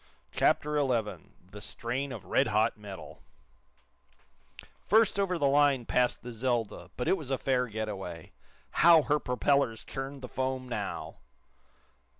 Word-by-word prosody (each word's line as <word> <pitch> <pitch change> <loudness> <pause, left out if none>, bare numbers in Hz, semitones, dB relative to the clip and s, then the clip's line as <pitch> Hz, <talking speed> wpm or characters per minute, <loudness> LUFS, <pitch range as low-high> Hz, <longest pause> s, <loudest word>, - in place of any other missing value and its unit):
CHAPTER 150 0 +2
XI 120 -6 -1 0.3
THE 105 +1 -10
STRAIN 125 +6 -4
OF 110 -7 -7
RED - - +2
HOT 110 +1 +2
METAL 105 -3 -10 1.6
First 220 -1 +3
over 185 -3 +1
the 145 - +1
line 140 -3 +3
passed 125 -1 +1
the 125 - -6
"Zelda," 115 -2 -2
but 125 - -2
it - - +4
was 150 -6 -8
a 135 - +1
fair 125 -2 +1
get 110 -1 -4
away. 90 -6 -7 0.5
How 165 -2 +8
her 150 +1 +2
propellers 125 -2 +1
churned 135 0 -6
the - - -4
foam 130 0 -3
now! 125 - -4
125 Hz, 145 wpm, -30 LUFS, 110-140 Hz, 1.6 s, How